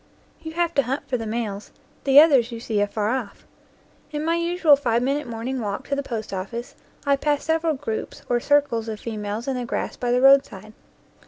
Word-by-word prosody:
You 320 0 -7
have 340 0 0
to 280 - +4
hunt 270 +1 -4
for 250 - -1
the 225 -1 -5
males; 215 -2 -4 0.3
the 275 0 +8
others 275 -6 +5
you 230 - -6
see 220 -3 -1
afar 205 +1 0
off. 245 -6 -4 0.7
In 300 0 -3
my 330 - +2
usual 340 -3 +4
five 240 -4 0
minute 280 +2 -1
morning 235 +3 -4
walk 205 -2 -4
to 280 - +1
the 280 - -1
post 225 -6 -5
office 215 +6 -5 0.3
I 280 0 +4
pass 290 +1 0
several 320 -1 +1
groups 260 -5 -5
or 240 - +1
circles 260 -5 +1
of 215 -1 -5
females 215 +1 -5
in 270 - -1
the 250 - -3
grass 235 - -3
by 245 -1 -1
the 250 - +3
road 270 +1 +7
side. 215 +1 -12
250 Hz, 210 wpm, -23 LUFS, 225-285 Hz, 0.7 s, the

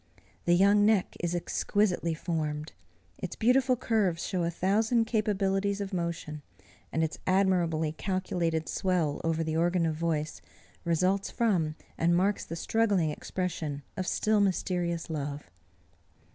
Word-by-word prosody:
The 175 - +5
young 200 +3 +5
neck 210 -3 +2
is 175 0 -1
exquisitely 175 -1 0
formed. 155 -2 -3 0.5
Its 185 - -5
beautiful 255 +2 +3
curves 210 -8 0
show 185 -3 -1
a 170 - +1
thousand 220 +7 +2
capabilities 200 -2 0
of 200 -1 -4
motion; 170 -3 -3 0.5
and 160 - +1
its 160 - -3
admirably 175 -5 +2
calculated 170 -2 -1
swell 175 -6 0
over 165 0 0
the 160 0 -2
organ 175 +1 +2
of 160 - 0
voice, 155 -2 -2 0.4
results 185 +4 +1
from, 180 -10 +1 0.2
and 170 +1 +3
marks 195 +3 +1
the 165 - -6
struggling 200 -3 +1
expression 155 -4 -4
of 185 -1 -3
still 215 0 +2
mysterious 175 -3 0
love. 145 - -5
175 Hz, 130 wpm, -29 LUFS, 160-200 Hz, 0.5 s, The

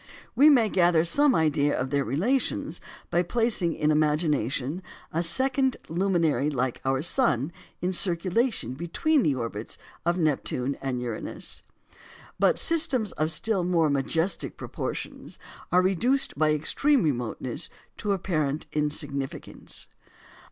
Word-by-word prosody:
We 295 +3 +7
may 245 -7 +5
gather 175 -5 +3
some 285 - +3
idea 145 -2 +2
of 130 +1 -2
their 140 -1 +2
relations 195 - -1 0.3
by 175 - +3
placing 210 -3 +1
in 150 0 +1
imagination 150 - 0 0.3
a 165 - +1
second 260 - +1
luminary 165 -6 +1
like 130 -3 -2
our 135 +1 0
sun 170 - +2 0.3
in 185 +1 0
circulation 180 - +1
between 175 - +1
the 145 - +2
orbits 115 -3 -4 0.3
of 170 +1 +1
Neptune 140 -4 0
and 130 -2 -2
Uranus. 120 -3 -4 0.8
But - - +4
systems 280 - +2
of 155 +1 -1
still 190 +4 0
more 170 -4 +2
majestic 160 +6 -1
proportions - - -6 0.3
are 180 +1 +4
reduced 240 +9 +1
by 155 +1 +2
extreme 260 - +2
remoteness 125 0 -2 0.3
to 205 -1 -1
apparent 155 -6 -1
insignificance. 145 -2 -2
165 Hz, 125 wpm, -26 LUFS, 140-200 Hz, 0.8 s, We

